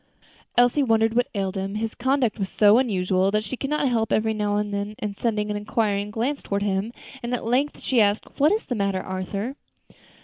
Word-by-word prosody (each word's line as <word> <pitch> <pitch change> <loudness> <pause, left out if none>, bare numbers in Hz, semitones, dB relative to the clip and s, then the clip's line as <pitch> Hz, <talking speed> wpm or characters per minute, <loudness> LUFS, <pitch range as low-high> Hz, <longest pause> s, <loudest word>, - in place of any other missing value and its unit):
Elsie 245 +4 +4
wondered 225 -3 +3
what 245 +1 +2
ailed 195 -2 -1
him, 195 +1 -3
his 220 +1 -2
conduct 260 -3 0
was 190 -1 -2
so 210 +2 +5
unusual, 190 -5 +1
and 215 +1 +1
she 230 - -4
could 270 +2 -4
not 300 -2 +1
help 225 -3 0
every 220 0 +2
now 210 -1 -1
and 210 0 -2
then 200 +1 -3 0.2
sending 210 -1 -1
an - - -2
inquiring 205 -1 -1
glance 240 +7 -2
toward 200 0 -2
him, 200 +2 -1 0.3
and 240 +1 -2
at 240 - -5
length 260 +5 0
she 250 -4 +2
asked, 205 0 +2
"What 295 +3 +5
is 435 +2 0
the 250 - -3
matter, 200 -4 0
Arthur?" 195 +8 -4
215 Hz, 205 wpm, -24 LUFS, 200-245 Hz, 0.3 s, so